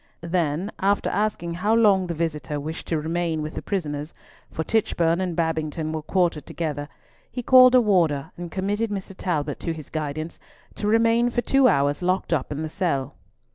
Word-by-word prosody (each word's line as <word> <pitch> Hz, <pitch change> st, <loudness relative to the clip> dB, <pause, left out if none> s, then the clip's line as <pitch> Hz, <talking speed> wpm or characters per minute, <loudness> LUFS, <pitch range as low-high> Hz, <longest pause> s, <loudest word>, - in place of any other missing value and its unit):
Then, 170 Hz, +2 st, -1 dB
after 200 Hz, +1 st, +1 dB
asking 200 Hz, -4 st, -1 dB
how 205 Hz, +6 st, +1 dB
long 200 Hz, -5 st, +4 dB
the 170 Hz, -, -3 dB
visitor 150 Hz, -3 st, -2 dB
wished 160 Hz, +3 st, -6 dB
to 160 Hz, -, 0 dB
remain 165 Hz, 0 st, -1 dB
with 155 Hz, -, -5 dB
the -, -, -5 dB
prisoners—for 155 Hz, -2 st, -5 dB
Tichborne 170 Hz, -5 st, +1 dB
and 180 Hz, -3 st, -2 dB
Babington 160 Hz, -1 st, -1 dB
were 160 Hz, -1 st, -3 dB
quartered 170 Hz, -3 st, 0 dB
together—he 155 Hz, -, -6 dB
called 255 Hz, +1 st, +7 dB
a 250 Hz, -, +7 dB
warder 170 Hz, -10 st, +1 dB
and 175 Hz, 0 st, -7 dB
committed 205 Hz, +5 st, -1 dB
Mr. 195 Hz, -1 st, -5 dB
Talbot 150 Hz, -6 st, -2 dB
to 165 Hz, -, -2 dB
his 155 Hz, -2 st, -10 dB
guidance, 155 Hz, +1 st, -4 dB, 0.3 s
to 205 Hz, -, -3 dB
remain 230 Hz, +2 st, +3 dB
for 240 Hz, 0 st, 0 dB
two 270 Hz, +3 st, +4 dB
hours 145 Hz, -, +2 dB
locked 185 Hz, -1 st, 0 dB
up 145 Hz, -3 st, -1 dB
in 150 Hz, +2 st, -3 dB
the -, -, -2 dB
cell. 155 Hz, -7 st, -1 dB
170 Hz, 175 wpm, -24 LUFS, 155-200 Hz, 0.3 s, called